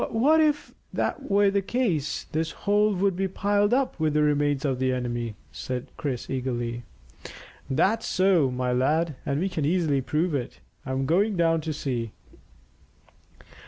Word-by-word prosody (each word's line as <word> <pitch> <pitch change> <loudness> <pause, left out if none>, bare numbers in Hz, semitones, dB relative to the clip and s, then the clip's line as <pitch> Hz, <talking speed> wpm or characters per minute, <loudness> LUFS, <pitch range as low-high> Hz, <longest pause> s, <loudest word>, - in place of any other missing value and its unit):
"But 295 +8 +4
if 295 -1 +1 0.2
that 280 - -2
were 200 0 +4
the 200 0 +1
case 190 - -1
this 160 +1 -1 0.2
hole 210 0 +3
would 195 0 +1
be 190 +1 0
piled 205 +2 +1
up 260 -6 +1
with 155 -1 +1
the 150 - +4
remains 145 -1 +1
of 130 -3 0
the 130 0 +1
enemy," 120 -3 -3 0.2
said 125 +9 -5
Chris 130 -5 -4
eagerly. 120 -3 -3 0.9
"That's 190 +11 +1
so, 185 -7 +3
my 125 0 -1
lad, 150 +6 +1
and 140 +1 0
we 185 - 0
can 165 -5 -3
easily 155 -3 +1
prove 155 +5 -1
it. 130 -4 -3 0.3
I'm 130 +1 -1
going 195 +7 +2
down 165 -1 +2
to 155 - -3
see." 125 -7 -3
155 Hz, 160 wpm, -26 LUFS, 130-195 Hz, 0.9 s, But